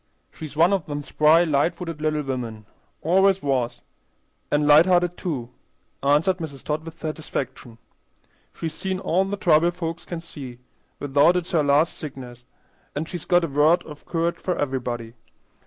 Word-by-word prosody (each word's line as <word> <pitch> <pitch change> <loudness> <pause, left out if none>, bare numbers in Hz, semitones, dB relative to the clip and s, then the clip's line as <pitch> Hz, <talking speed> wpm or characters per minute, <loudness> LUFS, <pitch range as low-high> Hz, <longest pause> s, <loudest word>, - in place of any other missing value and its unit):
She's 155 -1 -9
one 170 +5 +5
of 190 -5 -1
them 145 -1 -4
spry, 155 +4 +4
light 150 0 +1
footed 165 -4 -6
little 155 -1 0
women; 120 -5 -5 0.4
always 190 +3 +3
was, 130 -4 -1 0.7
an' 150 0 +2
light 150 +4 +7
hearted, 175 -1 +3
too," 130 -11 -4 0.5
answered 150 +7 +3
Mrs. 155 -6 -7
Todd, 155 +1 -2
with 165 0 -9
satisfaction. 155 -7 -5 0.7
"She's 160 -2 -5
seen 190 +3 -3
all 190 0 +1
the 200 +1 -3
trouble 170 -2 +4
folks 170 -1 -5
can 170 - -5
see, 140 -7 -9 0.4
without 145 +5 +3
it's 180 0 -2
her 165 -4 +3
last 145 +3 +3
sickness; 125 -4 -9 0.5
an' 150 +3 -2
she's 175 0 -7
got 175 -1 +3
a - - 0
word 150 +4 +3
of 150 -2 -12
courage 170 0 -1
for 180 - -2
everybody. 120 -5 -3
155 Hz, 160 wpm, -24 LUFS, 140-170 Hz, 0.7 s, light